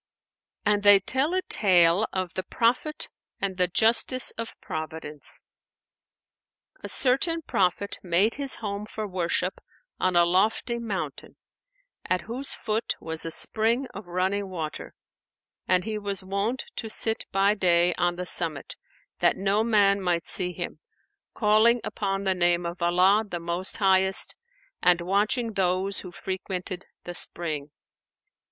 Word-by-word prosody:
'" -, -, -55 dB
And 205 Hz, -1 st, +3 dB
they 205 Hz, -1 st, +7 dB
tell 265 Hz, -, 0 dB
a 370 Hz, -, 0 dB
tale 180 Hz, 0 st, +4 dB
of 185 Hz, -1 st, -3 dB
THE 185 Hz, -, -2 dB
PROPHET 240 Hz, -, 0 dB, 0.3 s
AND 195 Hz, -2 st, -2 dB
THE 180 Hz, -1 st, +3 dB
JUSTICE 230 Hz, +6 st, +2 dB
OF 230 Hz, 0 st, -7 dB
PROVIDENCE. 155 Hz, -2 st, -5 dB, 1.4 s
A -, -, -5 dB
certain 320 Hz, +6 st, +1 dB
Prophet[FN#494] 195 Hz, -3 st, -1 dB
made 195 Hz, +7 st, +3 dB
his 280 Hz, -1 st, -1 dB
home 205 Hz, -1 st, -5 dB
for 215 Hz, 0 st, -5 dB
worship 180 Hz, -1 st, -2 dB, 0.4 s
on 185 Hz, -1 st, +1 dB
a 175 Hz, 0 st, +6 dB
lofty 215 Hz, +6 st, +1 dB
mountain, 215 Hz, -5 st, -5 dB, 0.7 s
at 185 Hz, -1 st, 0 dB
whose 250 Hz, +8 st, -4 dB
foot 220 Hz, +1 st, -2 dB
was 160 Hz, 0 st, 0 dB
a -, -, -2 dB
spring 225 Hz, +9 st, +3 dB
of 200 Hz, -1 st, -9 dB
running 190 Hz, +3 st, -1 dB
water, 160 Hz, -4 st, -6 dB, 0.7 s
and 180 Hz, 0 st, +3 dB
he 215 Hz, 0 st, -3 dB
was 200 Hz, -2 st, -3 dB
wont 200 Hz, +7 st, -2 dB
to 225 Hz, -, -4 dB
sit 225 Hz, +1 st, 0 dB
by 195 Hz, +1 st, +3 dB
day 175 Hz, -3 st, +3 dB
on 175 Hz, +1 st, 0 dB
the 180 Hz, +1 st, -5 dB
summit, 165 Hz, -5 st, -4 dB, 0.4 s
that -, -, +3 dB
no 200 Hz, +2 st, +1 dB
man 200 Hz, -3 st, +3 dB
might 175 Hz, -3 st, 0 dB
see 180 Hz, -2 st, +3 dB
him, -, -, -6 dB, 0.6 s
calling 220 Hz, +2 st, +4 dB
upon 195 Hz, -1 st, -2 dB
the 190 Hz, -1 st, +2 dB
name 175 Hz, -1 st, +2 dB
of 170 Hz, +1 st, -5 dB
Allah 180 Hz, +5 st, +4 dB
the 180 Hz, -5 st, -6 dB
Most 170 Hz, +2 st, -1 dB
Highest 190 Hz, -2 st, +2 dB, 0.5 s
and 180 Hz, -1 st, +4 dB
watching 210 Hz, +6 st, 0 dB
those 190 Hz, 0 st, 0 dB
who 180 Hz, -, -8 dB
frequented 185 Hz, 0 st, -5 dB, 0.2 s
the 175 Hz, -, -6 dB
spring. 155 Hz, -4 st, -3 dB
195 Hz, 145 wpm, -26 LUFS, 175-215 Hz, 1.4 s, they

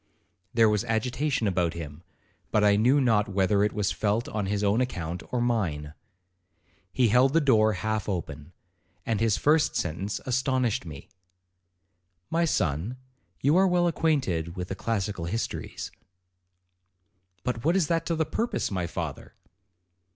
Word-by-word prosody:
There 115 Hz, -1 st, +4 dB
was 105 Hz, 0 st, +1 dB
agitation 125 Hz, +3 st, 0 dB
about 90 Hz, -3 st, 0 dB
him, 80 Hz, -2 st, -7 dB, 0.5 s
but 105 Hz, -, +2 dB
I 105 Hz, -1 st, +5 dB
knew 125 Hz, +7 st, +4 dB
not 115 Hz, -4 st, +2 dB
whether 100 Hz, +1 st, +2 dB
it 105 Hz, -, +1 dB
was 105 Hz, -2 st, -1 dB
felt 110 Hz, +2 st, 0 dB
on 105 Hz, -2 st, -3 dB
his 100 Hz, +1 st, -1 dB
own 105 Hz, +4 st, +2 dB
account 85 Hz, -8 st, -3 dB
or 125 Hz, -, 0 dB
mine. 90 Hz, -12 st, -1 dB, 1.0 s
He 125 Hz, -3 st, +2 dB
held 125 Hz, +4 st, +4 dB
the 165 Hz, -, +5 dB
door 110 Hz, -7 st, +4 dB
half 110 Hz, +2 st, -2 dB
open, 80 Hz, -4 st, -5 dB, 0.5 s
and 110 Hz, -3 st, 0 dB
his 110 Hz, -2 st, +2 dB
first 150 Hz, +1 st, +3 dB
sentence 95 Hz, +5 st, -2 dB
astonished 130 Hz, -5 st, 0 dB
me.—'My 90 Hz, -, -8 dB
son, 90 Hz, -, -1 dB, 0.4 s
you 145 Hz, +4 st, +3 dB
are 190 Hz, +1 st, +5 dB
well 175 Hz, -1 st, +2 dB
acquainted 135 Hz, -, 0 dB
with 90 Hz, 0 st, -4 dB
the 95 Hz, -, -3 dB
classical 100 Hz, -3 st, -2 dB
histories.' 115 Hz, +7 st, -4 dB, 1.5 s
'But 125 Hz, -2 st, -2 dB
what 165 Hz, +5 st, +2 dB
is 190 Hz, -4 st, +3 dB
that 165 Hz, +1 st, -1 dB
to 170 Hz, -, 0 dB
the 160 Hz, 0 st, 0 dB
purpose, 225 Hz, -, -2 dB
my 90 Hz, -3 st, -1 dB
father?' -, -, -6 dB
105 Hz, 145 wpm, -27 LUFS, 90-130 Hz, 1.5 s, I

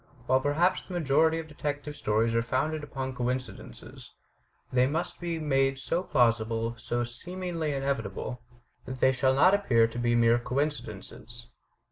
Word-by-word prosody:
While 130 Hz, +1 st, +3 dB
perhaps 165 Hz, +7 st, +2 dB
the 185 Hz, -, -8 dB
majority 160 Hz, 0 st, +3 dB
of 165 Hz, -1 st, -5 dB
detective 150 Hz, -1 st, -4 dB
stories 110 Hz, 0 st, +1 dB
are 115 Hz, -, +2 dB
founded 150 Hz, +6 st, -1 dB
upon 135 Hz, -2 st, -4 dB
coincidences, 125 Hz, -, -5 dB, 0.6 s
they 125 Hz, 0 st, +4 dB
must 160 Hz, +5 st, -3 dB
be 170 Hz, -1 st, -3 dB
made 135 Hz, -3 st, +1 dB
so 165 Hz, +6 st, -1 dB
plausible, 115 Hz, -6 st, +1 dB
so 120 Hz, +1 st, -2 dB
seemingly 170 Hz, +6 st, -4 dB
inevitable, 125 Hz, -4 st, -3 dB, 0.4 s
that 130 Hz, 0 st, -6 dB
they 130 Hz, -, +5 dB
shall 130 Hz, 0 st, +2 dB
not 185 Hz, +8 st, +6 dB
appear 125 Hz, -, +4 dB
to 115 Hz, +1 st, -5 dB
be 120 Hz, 0 st, +2 dB
mere 120 Hz, 0 st, +4 dB
coincidences. 130 Hz, -, -4 dB
130 Hz, 145 wpm, -28 LUFS, 120-155 Hz, 0.6 s, not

